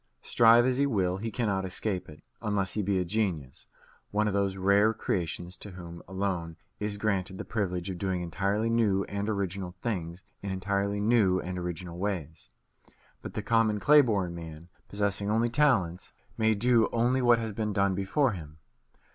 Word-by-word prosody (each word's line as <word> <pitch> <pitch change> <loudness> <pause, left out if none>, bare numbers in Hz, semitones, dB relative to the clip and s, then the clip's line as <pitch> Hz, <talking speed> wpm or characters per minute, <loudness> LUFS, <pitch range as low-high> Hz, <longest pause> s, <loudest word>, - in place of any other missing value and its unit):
Strive 115 +1 +5
as 130 0 +1
he 140 - +3
will, 95 -7 0
he 115 +3 -4
cannot 100 -4 -1
escape 95 0 -3
it 75 0 -14 0.2
unless 105 -4 -1
he 105 - -1
be 100 -1 0
a 90 - 0
genius, 85 -9 -2 0.4
one 105 +1 +1
of 105 - -1
those 100 -1 0
rare 100 +3 +3
creations 90 -3 -3
to 105 - -9
whom 85 -2 -9
alone 95 -4 -3 0.2
is 105 0 -2
granted 95 -3 -1
the - - -6
privilege 90 -5 -2
of 95 -2 -5
doing 95 -2 -1
entirely 100 +6 -1
new 110 -4 +2
and 100 +2 -3
original 95 -3 -3
things 90 -6 -3 0.2
in 100 - -5
entirely 100 +2 -1
new 105 -4 +3
and 90 0 -4
original 90 0 -5
ways. 90 -6 -4 0.7
But - - -8
the 105 - -3
common 110 -1 +2
clay 150 +6 +7
born 100 -9 0
man, 80 0 -9 0.2
possessing 100 0 -1
only 115 +2 +2
talents, 115 - +1 0.2
may 110 0 +2
do 115 +1 +3
only 120 +3 +2
what 120 -1 +5
has 110 -2 -4
been 105 0 -2
done 100 -1 +2
before 100 +8 +1
him. 80 -5 -9
100 Hz, 175 wpm, -29 LUFS, 90-110 Hz, 0.7 s, clay